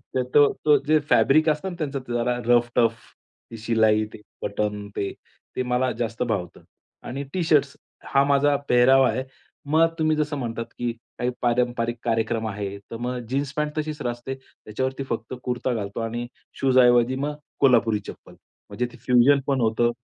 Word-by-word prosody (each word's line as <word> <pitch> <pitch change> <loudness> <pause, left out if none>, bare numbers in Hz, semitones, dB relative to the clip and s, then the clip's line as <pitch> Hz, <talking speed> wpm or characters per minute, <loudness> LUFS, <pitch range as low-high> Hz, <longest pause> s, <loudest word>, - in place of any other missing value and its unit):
ते 130 - +2
तो 145 -1 +7
तो 150 -1 +6
जे 155 0 +5
फॅब्रिक 155 +3 +4
असतं 155 +5 -1
ना 180 - -7
त्याचं 140 -2 -3
जरा 120 +1 0
रफ-टफ 120 -1 +3 0.6
ती 115 - -7
शिलाई, 110 -1 +2
ते 105 - -11 0.2
बटन, 105 0 -2
ते, 100 - -2 0.4
ते 130 - 0
मला 125 +1 0
जास्त 115 +1 -2
भावतं. 100 -7 -3 0.4
आणि 140 +3 -5
टी-शर्ट्स 150 -6 +2 0.4
हा 135 0 +5
माझा 140 +1 +3
पेहरावा 130 +2 +5
आहे. 130 - -2 0.4
मग 155 +3 +2
आता 165 0 +3
तुम्ही 155 0 +2
जसं 150 -1 -1
म्हणतात 115 -3 -4
की 120 -1 -1 0.3
काही 125 - 0
पारंपरिक 120 -1 0
कार्यक्रम 115 -1 0
आहे. 100 -1 -4
तर 115 +3 -9
मग 125 +1 -3
जीन्स 140 +1 -2
पॅन्ट 150 0 -2
तशीच 155 -1 -4
राहते. 120 +2 -4
त्याच्यावरती 130 +1 -5
फक्त 115 +1 -4
कुर्ता 125 0 -1
घालतो 100 -2 -4
आणि 120 +1 -3 0.3
शूज 130 -1 +3
ऐवजी 120 0 +5
मग 145 +3 -3 0.2
कोल्हापुरी 115 -5 +4
चप्पल. - - -11 0.4
म्हणजे 125 - -2
ते - - -13
फ्युजन 125 +3 +5
पण 135 -2 +1
होतं 115 +1 +2
125 Hz, 170 wpm, -24 LUFS, 115-140 Hz, 0.6 s, तो